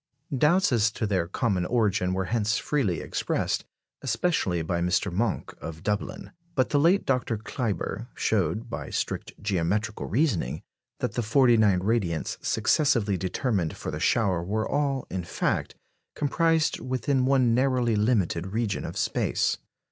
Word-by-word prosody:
Doubts 170 +7 +3
as 115 -2 +3
to 110 - -2
their 95 -5 0
common 95 -1 0
origin 95 -4 +1
were 95 0 -1
hence 110 -1 +1
freely 115 - 0
expressed, - - -1 0.4
especially 95 - 0
by 85 +1 -1
Mr. 90 +2 +1
Monck 105 +2 -1
of 80 0 -7
Dublin. 105 0 -3 0.2
But 130 -2 +2
the 145 - +3
late 175 +7 +4
Dr. 125 -4 0
Kleiber 110 0 -3
showed, 110 +3 0
by 115 - -5
strict - - -3
geometrical 105 +2 -1
reasoning, 95 - 0 0.4
that - - 0
the - - 0
forty 120 +2 +4
nine 105 -5 +4
radiants 95 -6 -1
successively 115 -10 +2
determined 95 - -1
for - - -5
the - - -4
shower 95 -7 +2
were 110 +4 -1
all, 140 -2 0
in 90 -1 -2
fact, - - -1 0.4
comprised 160 +2 +1
within 130 +1 0
one 130 -4 +4
narrowly 125 -2 +2
limited 105 -6 +1
region 110 +1 -2
of - - -6
space. - - 0
110 Hz, 145 wpm, -27 LUFS, 95-130 Hz, 0.4 s, late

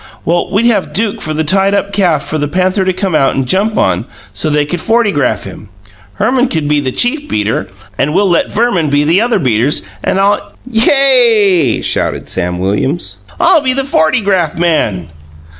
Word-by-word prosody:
Well, 170 +1 0
we'd 205 +4 +1
have 225 -5 +1
Duke 210 0 -1
for 155 - -4
the 160 - 0
tied 195 +5 +1
up 200 0 -2
calf 175 -8 +1
for 155 - -3
the 145 - -1
panther 185 +4 0
to 185 - +2
come 185 0 -3
out 135 -3 +2
and 135 - -1
jump 200 - 0
on, 95 +3 +1 0.3
so 155 - -2
they 150 0 +1
could 175 +4 -4
fortygraph 205 - 0
him. 100 +1 -11 0.5
Herman 250 +4 +1
can 160 -8 -2
be 150 0 +2
the 130 -2 -2
chief 290 - -1
beater, 105 +1 -1 0.3
and 140 - +1
we'll 200 +1 +3
let 175 -2 +1
Verman 200 -8 0
be 145 +1 +2
the 165 +7 +2
other 235 -1 +1
beaters, 130 - 0 0.2
and 195 - 0
I'll 200 +1 0
" - - -31
"Yay!" 225 - +3
shouted - - -2
Sam 90 0 -3
Williams. 100 - -2 0.2
"I'll 345 -3 +4
be 260 -2 0
the 270 +1 -1
fortygraph 180 - 0
man!" 135 - 0
180 Hz, 190 wpm, -12 LUFS, 145-215 Hz, 0.5 s, I'll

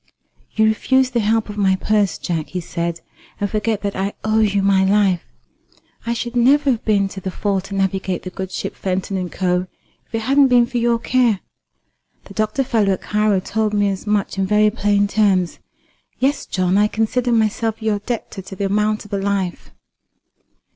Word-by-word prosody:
"You 220 - +4
refuse 255 +4 +2
the 240 - +1
help 220 +1 +1
of 210 0 -6
my 190 -2 +3
purse, 205 0 +1
Jack," 165 -3 -3
he 185 - -4
said, 170 -1 -4 0.4
"and 205 - 0
forget 210 0 -1
that 200 -1 -2
I 195 +2 -2
owe 215 0 +2
you 200 -2 +2
my 195 -1 +4
life. 195 -3 +3 0.9
I 235 - 0
should 240 +1 -4
never 275 +4 +4
have 235 - -2
been 200 -3 +2
to 195 - -8
the 190 - -3
fore 195 +1 -1
to 195 +1 -8
navigate 190 -1 -1
the 185 - -6
good 190 0 -6
ship - - -4
Fenton 190 +1 -2
and 180 -2 -3
Co., 180 -1 0 0.4
if - - -7
it 225 - -1
hadn't 275 +4 +4
been 245 -2 +5
for 245 0 -3
your 235 0 +2
care. 235 -3 +1 0.8
The - - -12
doctor 215 +5 0
fellow 215 -6 +2
at 185 - -5
Cairo 210 -2 +1
told 215 +2 -1
me 205 -1 +2
as 195 +2 -5
much 205 -2 0
in 190 - +1
very 210 +1 +4
plain 205 -2 +1
terms. 195 -4 +1 0.6
Yes, 275 +3 0
John, 185 +1 +1
I 210 - +4
consider 235 +3 0
myself 225 0 +1
your 215 -2 0
debtor 220 -2 -5
to 190 +1 -10
the 200 - -2
amount 210 +2 0
of 205 - -12
a 200 - 0
life." 195 -2 -2
205 Hz, 195 wpm, -20 LUFS, 195-225 Hz, 0.9 s, been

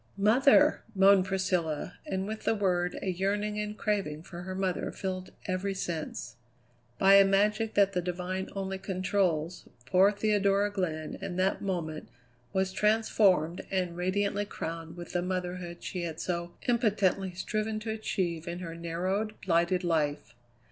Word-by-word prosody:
"Mother!" 265 +8 +5
moaned 195 -1 +6
Priscilla, 185 -5 -1
and 190 0 -2
with 215 +1 -5
the - - +3
word 180 -3 0
a 190 - 0
yearning 205 +3 -1
and 210 0 -4
craving 190 -8 -1
for 175 0 -9
her 185 +1 -5
mother 185 -1 -1
filled 185 -1 -4 0.2
every 190 +1 -1
sense. 160 - -4 0.6
By 195 +1 +7
a 200 - +9
magic 210 +3 +2
that 200 -1 +4
the 180 - +1
divine 180 +2 -3
only 195 -1 -3
controls, 185 -4 -1 0.2
poor 185 +8 +5
Theodora 205 -1 +2
Glenn 160 -6 -3
in 175 - -4
that 185 +1 +1
moment 170 -6 -3 0.4
was 190 0 0
transformed 205 -6 +3
and 180 -3 -1
radiantly 200 +3 0
crowned 165 -3 -6
with 175 -1 -8
the 175 - +1
motherhood 180 -1 -4
she 180 - -4
had 165 -2 -4
so 170 -1 -3
impotently 205 -6 +1
striven 215 +3 -2
to 220 0 -3
achieve 175 -6 -2
in 170 0 -3
her 170 -2 -6
narrowed, 185 +6 -2
blighted 175 +1 +2
life. 150 -7 0
185 Hz, 150 wpm, -29 LUFS, 175-200 Hz, 0.6 s, a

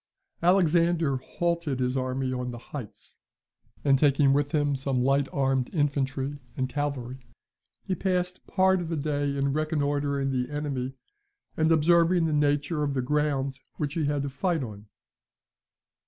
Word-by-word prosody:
Alexander 170 -4 +3
halted 170 0 -2
his 125 0 0
army 130 0 -1
on 125 0 -3
the 120 - -6
heights; 120 -1 -10 0.7
and 135 -2 +4
taking 140 -1 +4
with 145 0 +1
him 145 -2 +1
some 130 -2 -1
light 135 +1 +2
armed 135 -2 +1
infantry 140 -1 -1 0.2
and 130 -1 0
some - - -16
cavalry, 135 -3 -3 0.6
he 190 - -2
passed 180 -1 -2
part 190 -1 +3
of 165 - -5
the 165 - -1
day 145 -1 -1
in 140 0 +1
reconnoitring 145 -2 0
the 125 -1 -1
enemy, 140 -3 -3 0.6
and 160 +1 +2
observing 170 +2 +4
the 160 - 0
nature 145 +1 +1
of 145 -2 -1
the 130 - +1
ground 140 -1 0 0.2
which 145 -2 -3
he 160 -3 0
had 145 -1 0
to 140 - -2
fight 160 +2 0
on. 105 -3 -9
145 Hz, 155 wpm, -27 LUFS, 135-155 Hz, 0.7 s, and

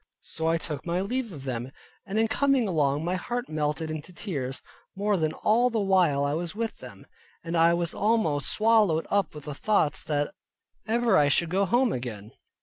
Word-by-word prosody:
So 160 0 -4
I 165 0 +3
took 150 -3 -5
my 175 +1 -1
leave 235 +3 -2
of 145 -6 -9
them, 125 -1 -4 0.4
and 200 +2 -3
in 225 0 +3
coming 270 0 +2
along 150 -3 +1
my 175 - 0
heart 240 +7 -3
melted 155 +1 -2
into 155 +3 -6
tears, 145 - -5 0.3
more 205 +1 +1
than 160 -4 0
all 235 +8 +2
the 230 -2 -1
while 180 -8 +3
I 140 - 0
was 170 +2 -3
with 225 0 -3
them, - - -12 0.4
and 165 0 -4
I 165 +1 +5
was 170 -1 -2
almost 205 -10 +1
swallowed 215 -7 +3
up 200 -6 +1
with 150 - -8
the 150 - -6
thoughts 160 -1 +1
that 145 -1 -1 0.5
ever 235 +1 +3
I 145 - +4
should 165 +3 +2
go 195 +2 +2
home 240 +4 +2
again. 110 -4 -6
170 Hz, 195 wpm, -27 LUFS, 150-215 Hz, 0.5 s, I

